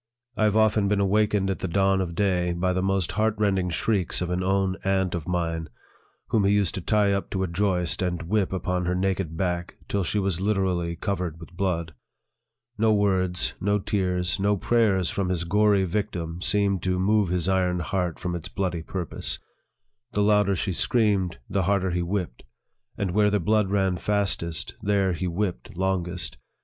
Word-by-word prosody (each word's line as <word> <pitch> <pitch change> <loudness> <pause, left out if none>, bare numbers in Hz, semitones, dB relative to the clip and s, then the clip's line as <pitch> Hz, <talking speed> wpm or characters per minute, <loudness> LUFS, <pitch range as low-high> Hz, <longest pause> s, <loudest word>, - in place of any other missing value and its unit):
I 110 - +2
have 105 0 +2
often 110 -2 +3
been 100 0 +1
awakened 100 0 +2
at 95 - -4
the - - -2
dawn 95 +2 +2
of 85 -2 -4
day 90 -3 +1
by 90 +2 0
the 95 - 0
most 95 -2 0
heart 105 0 +1
rending 95 -3 +1
shrieks 95 +1 0
of 90 -1 -2
an 90 +1 0
own 95 0 +1
aunt 95 -2 +1
of 85 -3 -4
mine, 85 -2 -2 0.6
whom 110 - +2
he 100 +1 +3
used 100 -5 +1
to 95 - -4
tie 105 +1 +2
up 100 - -2
to 95 -1 -1
a - - 0
joist, 90 -1 0
and 90 -2 -1
whip 100 +3 0
upon 90 -1 -1
her 90 - +1
naked 95 -3 -1
back 90 -1 -2
till 100 -1 0
she 95 - -1
was 95 -3 0
literally 95 -4 0
covered 90 -3 -3
with 85 +1 -12
blood. 85 -4 -1 0.9
No 110 0 +4
words, 95 -3 +1
no 100 +2 +2
tears, 90 -2 0
no 100 +1 +2
prayers, 100 -5 +2
from 95 -2 -1
his 90 -2 0
gory 100 +2 +3
victim, 90 -3 -3
seemed 100 -2 +1
to 90 0 0
move 100 +1 +2
his 90 -1 0
iron 90 -2 +1
heart 90 -2 -2
from 90 - -3
its 85 -3 -5
bloody 90 -4 -2
purpose. 90 +1 -3 0.8
The 105 - +2
louder 105 -1 +3
she 95 +1 -1
screamed, 100 - +1
the 100 - 0
harder 95 -2 +1
he 90 0 0
whipped; 85 -7 -3 0.6
and 100 -3 -1
where 105 +2 +3
the 105 0 +1
blood 105 +2 +2
ran 95 -2 +1
fastest, 95 -5 -1
there 100 -2 +1
he 85 +2 -2
whipped 90 -4 -3
longest. 95 -2 -2
95 Hz, 185 wpm, -25 LUFS, 90-100 Hz, 0.9 s, No